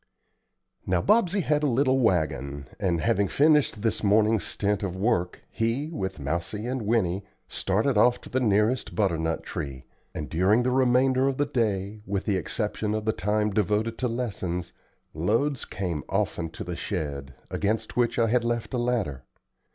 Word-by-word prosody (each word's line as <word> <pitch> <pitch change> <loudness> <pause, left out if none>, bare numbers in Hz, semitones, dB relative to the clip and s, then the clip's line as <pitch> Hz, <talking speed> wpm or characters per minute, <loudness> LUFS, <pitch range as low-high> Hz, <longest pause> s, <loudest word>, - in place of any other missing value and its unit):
Now 90 -1 +2
Bobsey 205 -3 +3
had 150 -3 +1
a 150 - +2
little 130 +1 +2
wagon, 70 - 0
and, 85 -4 0
having 100 +5 +2
finished 145 - +3
his 115 - 0
morning 110 +2 +4
stint 100 +1 -1
of 95 -3 -3
work, 95 -3 0
he, 120 +8 -1
with 95 - -4
Mousie 85 +9 -3
and 130 +1 -2
Winnie, 100 -4 +1 0.2
started 105 +4 +1
off 125 +3 +4
to - - -11
the 130 - +1
nearest 110 +1 +1
butternut 80 -6 0
tree; 65 -2 -6 0.3
and 75 - -4
during 95 +8 +3
the 125 - +1
remainder 130 +1 +3
of 135 -1 -1
the 145 - +2
day, 105 -6 -1
with 100 0 -1
the 105 - +1
exception 105 +2 -2
of 110 0 -3
the 110 - +2
time 105 +3 0
devoted 105 +3 0
to 130 - +1
lessons, 100 -8 -3 0.4
loads 115 - 0
came 90 -6 -3
often 80 -1 -1
to - - -7
the 90 0 -5
shed, 70 -7 -4 0.2
against 110 +2 -1
which 120 -1 +1
I 115 - +4
had 120 +2 +2
left 120 +1 -2
a 125 - 0
ladder. 115 - -1
105 Hz, 165 wpm, -26 LUFS, 90-125 Hz, 0.4 s, morning